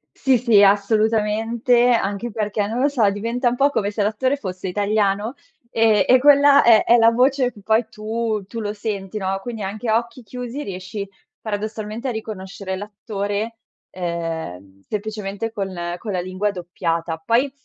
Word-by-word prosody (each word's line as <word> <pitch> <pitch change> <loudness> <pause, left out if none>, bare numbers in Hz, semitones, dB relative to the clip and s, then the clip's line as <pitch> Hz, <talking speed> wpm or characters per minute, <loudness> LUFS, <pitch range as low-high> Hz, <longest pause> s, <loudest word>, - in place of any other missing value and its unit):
Sì, 265 -2 +3
sì, 230 -4 +4
assolutamente, 220 +4 +2
anche 225 -1 0
perché, 210 -2 -2
non 225 +3 -3
lo 275 - +3
so, 245 -8 +2
diventa 230 +5 -1
un 240 - -2
po' 280 +3 +3
come 205 -6 0
se 210 0 -1
l'attore 240 +6 +1
fosse 185 -6 -6
italiano, 205 +3 0 0.4
ehm, 220 -3 +4
e 255 - +6
quella 285 +1 +6
è 230 -2 +6
è 240 - +5
la 230 -1 +6
voce 255 +2 +2
che 210 - -16
poi 220 +2 +2
tu 220 -1 -3
tu 230 - -6
lo 210 -1 -3
senti, 205 -2 -4
no, 195 -1 -2
quindi 225 -1 -6
anche 215 +4 -4
a 220 - +4
occhi 235 +2 -5
chiusi, 250 +4 -6
riesci 195 0 -6 0.3
paradossalmente 215 +3 -4
a - - -1
riconoscere 195 -3 -6
l'attore, 205 +2 -4 0.3
ehm, 165 - -5
semplicemente 210 0 -4
con 195 -4 -4 0.2
con 210 +3 -6
la 180 - -1
lingua 185 +3 -2
doppiata. 170 -3 -3
Poi, 235 - +1
215 Hz, 165 wpm, -21 LUFS, 200-235 Hz, 0.4 s, e